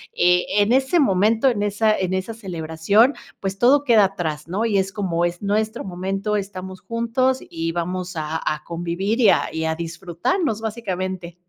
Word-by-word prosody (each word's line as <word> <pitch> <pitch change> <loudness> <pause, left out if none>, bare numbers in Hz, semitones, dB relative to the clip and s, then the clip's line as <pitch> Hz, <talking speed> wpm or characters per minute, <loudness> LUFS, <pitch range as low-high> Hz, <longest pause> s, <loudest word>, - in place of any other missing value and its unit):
eh, 180 0 +3
en 205 +3 +3
ese 265 +6 +3
momento, 220 +1 +3
en 205 -4 -1
esa 215 +1 +2
en 185 -1 -1
esa 190 +4 -2
celebración 190 - +1 0.3
pues 195 0 -3
todo 275 +5 +4
queda 225 -6 +5
atrás, 160 -5 -4
¿no? 200 +6 -1
Y 215 -3 +1
es 190 0 0
como 175 -4 0
es 175 0 -3
nuestro 215 +3 -1
momento 195 +3 -2
estamos 190 -1 -6
juntos 235 +5 0
y 165 0 -3
vamos 180 +1 -3
a 155 0 -2
a 155 0 -1
convivir 175 +7 -2
y 215 - +7
a - - +3
y 160 - -2
a 160 0 0
disfrutarnos 175 - -2
básicamente. 185 -6 -4
190 Hz, 170 wpm, -22 LUFS, 175-220 Hz, 0.3 s, y